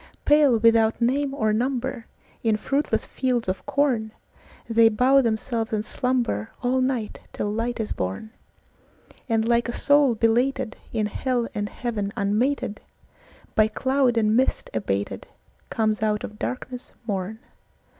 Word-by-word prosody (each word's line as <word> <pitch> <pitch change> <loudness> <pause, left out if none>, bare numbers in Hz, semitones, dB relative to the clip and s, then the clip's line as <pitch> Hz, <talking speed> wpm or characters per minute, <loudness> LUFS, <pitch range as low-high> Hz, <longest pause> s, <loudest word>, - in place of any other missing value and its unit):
Pale, 290 -5 +5
without 225 0 +4
name 270 +4 +1
or 220 -6 0
number, 250 +1 -2 0.3
In 220 -2 +2
fruitless 275 +7 -1
fields 250 -4 -1
of 185 +1 -2
corn, 265 -6 +1 0.5
They 225 0 +5
bow 255 +5 +4
themselves 225 -1 -1
and 210 -1 0
slumberAll 250 - -1
night 255 -5 -1
till 205 - -2
light 230 +2 -2
is 220 - -3
born; 95 - -4 1.0
And 225 0 +1
like 235 0 +2
a - - 0
soul 285 -1 +3
belated, 240 +3 +1 0.2
In 220 -2 0
hell 240 +3 -1
and 205 0 -3
heaven 215 -5 -3
unmated, 215 +3 0 0.7
By 215 0 +4
cloud 260 +2 +1
and 215 -1 +3
mist 260 +2 +1
abatedComes 110 - -3
out 210 -1 0
of 210 0 -8
darkness 255 0 -5
morn. 200 0 -3
230 Hz, 130 wpm, -24 LUFS, 215-255 Hz, 1.0 s, Pale